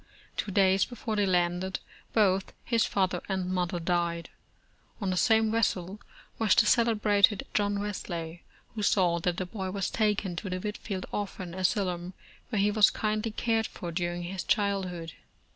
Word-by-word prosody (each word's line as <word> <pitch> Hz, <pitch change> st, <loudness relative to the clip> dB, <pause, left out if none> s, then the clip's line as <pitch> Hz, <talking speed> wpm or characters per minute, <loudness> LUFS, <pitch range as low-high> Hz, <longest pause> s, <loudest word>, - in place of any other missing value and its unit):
Two -, -, -2 dB
days 190 Hz, 0 st, +4 dB
before 235 Hz, -3 st, -4 dB
they 205 Hz, -1 st, +2 dB
landed, 180 Hz, +1 st, +1 dB, 0.3 s
both 195 Hz, -3 st, +2 dB
his 230 Hz, -2 st, +2 dB
fath 190 Hz, -2 st, +1 dB
er 180 Hz, -, -2 dB
and 185 Hz, -1 st, -1 dB
mother 180 Hz, -1 st, -1 dB
died. 170 Hz, -1 st, -1 dB, 0.7 s
On 195 Hz, -4 st, -1 dB
the -, -, 0 dB
same 220 Hz, +3 st, +3 dB
vessel 200 Hz, -3 st, 0 dB, 0.4 s
was 220 Hz, -4 st, +4 dB
the -, -, +5 dB
cele 230 Hz, +1 st, +4 dB
brated 205 Hz, -1 st, +3 dB
John 205 Hz, -1 st, +1 dB
Wesley, 175 Hz, -5 st, -4 dB, 0.3 s
who 215 Hz, -, -4 dB
saw 180 Hz, -4 st, +3 dB
that 175 Hz, 0 st, -1 dB
the 185 Hz, -, -2 dB
boy 190 Hz, 0 st, -5 dB
was 195 Hz, 0 st, -2 dB
taken 210 Hz, -4 st, 0 dB
to 190 Hz, -, -4 dB
the 185 Hz, -, -2 dB
Whitefield 205 Hz, -1 st, -4 dB
Orphan 190 Hz, -4 st, -4 dB
Asylum, 185 Hz, -1 st, -1 dB, 0.3 s
where 220 Hz, -4 st, 0 dB
he 205 Hz, +1 st, +3 dB
was 210 Hz, 0 st, +6 dB
kindly 215 Hz, +1 st, -1 dB
cared 225 Hz, 0 st, 0 dB
for 175 Hz, -, -7 dB
during 175 Hz, 0 st, -2 dB
his 185 Hz, +1 st, -4 dB
childhood. 185 Hz, -5 st, -1 dB
190 Hz, 165 wpm, -29 LUFS, 180-210 Hz, 0.7 s, was